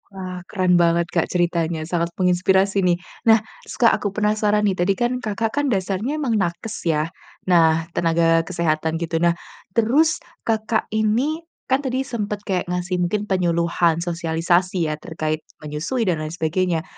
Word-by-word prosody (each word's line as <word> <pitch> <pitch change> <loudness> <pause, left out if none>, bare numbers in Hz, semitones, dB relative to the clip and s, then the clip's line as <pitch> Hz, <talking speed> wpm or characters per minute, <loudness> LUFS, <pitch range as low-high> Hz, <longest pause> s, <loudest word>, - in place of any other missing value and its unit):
Wah 185 -2 -7
keren 185 -3 +1
banget 170 0 +3
Kak, 165 - +1
ceritanya 170 -2 0
sangat 170 0 0
menginspirasi 190 +2 +2
nih. 175 -1 +3 0.3
Nah, 225 0 +7 0.2
se - - -9
Kak 235 -3 +5
aku 205 - 0
penasaran 210 0 +2
nih. 200 - +2
Tadi 180 +3 +3
kan, 240 0 +1
Kakak 220 0 -2
kan - - -1
dasarnya 200 +6 -1
emang 275 -6 -1
nakes 190 +5 -4
ya, 155 0 +1 0.4
nah 165 -3 +4
tenaga 165 0 +3
kesehatan 160 -2 0
gitu. 165 -1 -2
Nah, 170 0 +3 0.4
terus 285 +8 +3 0.3
Kakak 220 0 0
ini, 240 +10 0 0.3
kan 265 - +4
tadi 265 -1 -1
sempet 210 -5 -4
kayak 185 -3 -2
ngasih 180 +1 -2
mungkin 180 +4 0
penyuluhan, 170 -3 +1
sosialisasi 170 0 0
ya, 150 - -4
terkait 155 -1 -3 0.2
menyusui 155 - -2
dan 180 -6 0
lain 155 - -3
sebagainya. 165 +1 -1
180 Hz, 155 wpm, -22 LUFS, 170-210 Hz, 0.4 s, Nah